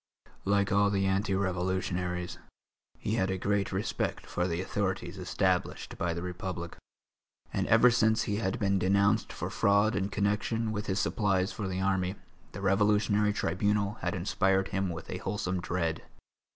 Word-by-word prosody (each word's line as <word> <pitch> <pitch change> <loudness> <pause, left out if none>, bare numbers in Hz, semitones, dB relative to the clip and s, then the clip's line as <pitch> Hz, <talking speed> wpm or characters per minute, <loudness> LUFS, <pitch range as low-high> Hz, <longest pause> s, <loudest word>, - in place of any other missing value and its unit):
Like 100 0 +2
all 100 +1 +4
the 100 -1 +1
anti 95 +1 +1
revolutionaries, 90 -1 -1 0.6
he 110 +2 -2
had 95 -3 +1
a 95 - -1
great 100 +1 0
respect - - -2
for 90 +1 -1
the 85 -1 -2
authorities 95 0 -2
established 90 0 -1
by 85 -1 0
the 85 - -4
Republic, 90 -1 -5 0.8
and - - 0
ever 115 +2 +6
since 110 -2 +3
he 105 -1 -1
had 110 +1 -1
been 100 -3 +1
denounced 100 +3 +2
for - - -5
fraud 100 +3 +3
in 100 -1 0
connection 105 +3 0
with 105 -1 -4
his 95 0 0
supplies 95 -2 +1
for 105 - -4
the 95 0 -2
army, 95 0 0 0.4
the - - -7
Revolutionary 105 +1 +3
Tribunal 105 +3 0
had 90 - -1
inspired 95 +1 +1
him 95 -1 -1
with 85 -1 -6
a - - -4
wholesome 95 -3 -2
dread. 85 -2 -2
95 Hz, 160 wpm, -30 LUFS, 95-105 Hz, 0.8 s, ever